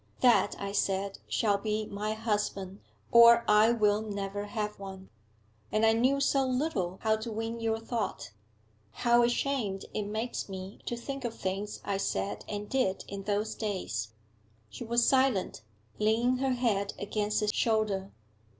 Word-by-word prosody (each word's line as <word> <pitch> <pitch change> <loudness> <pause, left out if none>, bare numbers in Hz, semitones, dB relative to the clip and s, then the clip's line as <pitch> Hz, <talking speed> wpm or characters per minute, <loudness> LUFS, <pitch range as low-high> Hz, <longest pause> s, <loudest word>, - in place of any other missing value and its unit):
That, 245 -2 +4
I 200 0 -3
said, 195 0 -1
shall 205 -3 +1
be 215 +1 -1
my 210 +1 -3
husband, 205 -3 -2 0.3
or 235 0 +8
I 210 +2 +6
will 210 -2 +2
never 205 -1 -4
have 210 -1 -3
one. 190 -1 -9 0.6
And 215 +1 +3
I 225 - +5
knew 255 +5 +2
so 275 0 +2
little 255 - -1
how 220 0 +3
to 220 +1 -6
win 225 +1 -3
your 225 -1 0
thought. 225 - -4 0.7
How 240 0 +6
ashamed 240 -5 0
it 210 -1 -2
makes 220 +1 -3
me 190 +1 -7
to 240 - -2
think 275 +3 -6
of 235 -2 -3
things 195 +2 -4
I 200 -1 -1
said 105 - -2
and 205 0 -4
did 255 -8 0
in 195 -1 -7
those 210 +1 -1
days!' 185 - -3 0.6
She 110 - -7
was 235 +1 +2
silent, 260 - +2 0.4
leaning 230 +4 +2
her 265 0 +1
head 210 -5 0
against 210 +1 -1
his 210 0 +1
shoulder. 215 -5 +1
215 Hz, 155 wpm, -30 LUFS, 200-235 Hz, 0.7 s, or